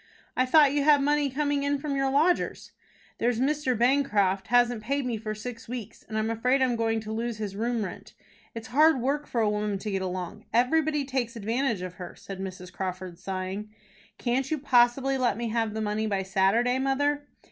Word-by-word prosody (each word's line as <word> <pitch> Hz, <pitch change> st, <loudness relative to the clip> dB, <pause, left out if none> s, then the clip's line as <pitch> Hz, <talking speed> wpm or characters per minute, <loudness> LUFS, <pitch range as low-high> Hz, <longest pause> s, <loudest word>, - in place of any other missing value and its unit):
"I 255 Hz, 0 st, +2 dB
thought 290 Hz, 0 st, +6 dB
you 290 Hz, -, +2 dB
had 290 Hz, -1 st, +5 dB
money 295 Hz, 0 st, +2 dB
coming 285 Hz, +1 st, 0 dB
in 285 Hz, 0 st, +1 dB
from 280 Hz, 0 st, -3 dB
your 270 Hz, 0 st, +1 dB
lodgers." 310 Hz, +6 st, +1 dB, 0.5 s
"There's 235 Hz, -1 st, +1 dB
Mr. 270 Hz, -2 st, +1 dB
Bancroft 210 Hz, -7 st, +2 dB
hasn't 245 Hz, -2 st, +3 dB
paid 275 Hz, +5 st, -1 dB
me 245 Hz, -2 st, -1 dB
for 215 Hz, 0 st, -4 dB
six 230 Hz, +2 st, -8 dB
weeks, 240 Hz, -4 st, -7 dB
and 220 Hz, -, -3 dB
I'm 220 Hz, +1 st, 0 dB
afraid 250 Hz, +4 st, +2 dB
I 260 Hz, -, +4 dB
am 245 Hz, -2 st, 0 dB
going 225 Hz, -1 st, 0 dB
to 215 Hz, 0 st, -7 dB
lose 230 Hz, 0 st, -3 dB
his 205 Hz, -3 st, -5 dB
room 230 Hz, 0 st, -1 dB
rent. 180 Hz, -, -9 dB, 0.4 s
It's 225 Hz, -1 st, -7 dB
hard 305 Hz, +3 st, +5 dB
work 285 Hz, +4 st, -1 dB
for 235 Hz, -, -1 dB
a 220 Hz, -, +3 dB
woman 210 Hz, -1 st, -1 dB
to 210 Hz, +2 st, -5 dB
get 195 Hz, -1 st, -1 dB
along. 180 Hz, -1 st, -5 dB
Everybody 295 Hz, +4 st, +2 dB
takes 255 Hz, -3 st, -2 dB
advantage 230 Hz, -1 st, -1 dB
of 180 Hz, -1 st, -6 dB
her," 180 Hz, -, -7 dB
said 195 Hz, -1 st, -9 dB
Mrs. 185 Hz, -1 st, -7 dB
Crawford, 185 Hz, -2 st, -5 dB
sighing. 190 Hz, +2 st, -4 dB, 0.5 s
"Can't 260 Hz, +2 st, -1 dB
you 315 Hz, -, 0 dB
possibly 265 Hz, 0 st, +3 dB
let 240 Hz, -5 st, +1 dB
me 235 Hz, -1 st, -2 dB
have 225 Hz, -1 st, -1 dB
the 220 Hz, -, -2 dB
money 215 Hz, +1 st, -1 dB
by 195 Hz, -2 st, -1 dB
Saturday, 205 Hz, +7 st, +2 dB
mother?" 285 Hz, +2 st, 0 dB
240 Hz, 200 wpm, -27 LUFS, 210-275 Hz, 0.5 s, thought